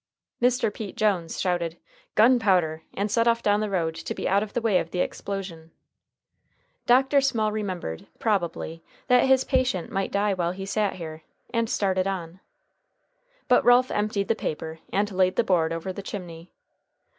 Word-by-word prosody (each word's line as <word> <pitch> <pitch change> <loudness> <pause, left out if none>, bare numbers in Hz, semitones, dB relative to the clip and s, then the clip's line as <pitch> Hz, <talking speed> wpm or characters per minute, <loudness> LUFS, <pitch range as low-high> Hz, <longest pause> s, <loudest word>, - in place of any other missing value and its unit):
Mr. 245 -3 +2
Pete 205 -3 -7
Jones 190 -6 0
shouted 175 -3 -1 0.4
"Gunpowder!" 195 -9 +4
and 200 +1 -1
set 230 +2 +2
off 235 0 +2
down 205 0 +3
the 215 -1 -1
road 170 -4 0
to - - -6
be - - -3
out 195 +2 +3
of 215 -1 -5
the - - +1
way 220 -5 +3
of 165 - -4
the 180 - -5
explosion. 180 -5 -4 1.2
Dr. 265 +3 +5
Small 230 -6 +1
remembered, 185 - -4
probably, 170 -6 -1 0.3
that 250 +1 +5
his 265 0 +4
patient 255 - 0
might 195 0 -2
die 200 0 +1
while 175 -2 -1
he 195 +1 -6
sat 205 0 0
here, 160 -3 -7 0.3
and 230 -1 0
started 190 -2 +1
on. 180 -2 -4 1.1
But 250 - +4
Ralph 245 +1 +5
emptied 210 -1 -1
the - - +3
paper, 160 -5 -5
and 205 +1 0
laid 185 0 +2
the - - +3
board 165 -4 +2
over 165 +3 -4
the 200 - -6
chimney. 175 -4 -8
195 Hz, 170 wpm, -25 LUFS, 175-220 Hz, 1.2 s, Dr